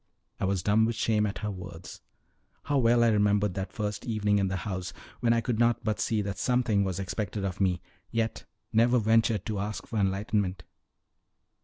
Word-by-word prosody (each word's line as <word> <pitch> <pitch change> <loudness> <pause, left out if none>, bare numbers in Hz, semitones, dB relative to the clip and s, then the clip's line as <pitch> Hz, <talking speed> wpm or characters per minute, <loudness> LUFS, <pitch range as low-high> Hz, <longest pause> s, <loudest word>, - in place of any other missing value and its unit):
I - - 0
was 95 -2 0
dumb 110 +2 +4
with 115 0 -1
shame 105 -1 +1
at 100 - -4
her 105 - -1
words. 90 -2 -9 0.6
How 145 -1 +1
well 120 -1 +4
I 115 - +5
remembered 105 -2 +2
that 95 +1 -4
first 105 -1 -3
evening 105 -4 +1
in 100 - +1
the 95 - -2
house, 95 -2 -4 0.3
when 120 -1 +2
I 115 0 +3
could 115 -2 -1
not 120 0 +2
but 110 -1 -1
see 110 -3 0
that 100 -1 -4
something 120 -3 +2
was 95 -1 -2
expected 100 +1 -3
of 95 0 -3
me, 90 -2 +1 0.3
yet 115 0 -2 0.3
never 120 +3 +4
ventured 110 -2 +2
to 105 -3 -2
ask 105 +2 -4
for 110 - -3
enlightment! 95 -1 0
105 Hz, 190 wpm, -28 LUFS, 95-115 Hz, 0.6 s, I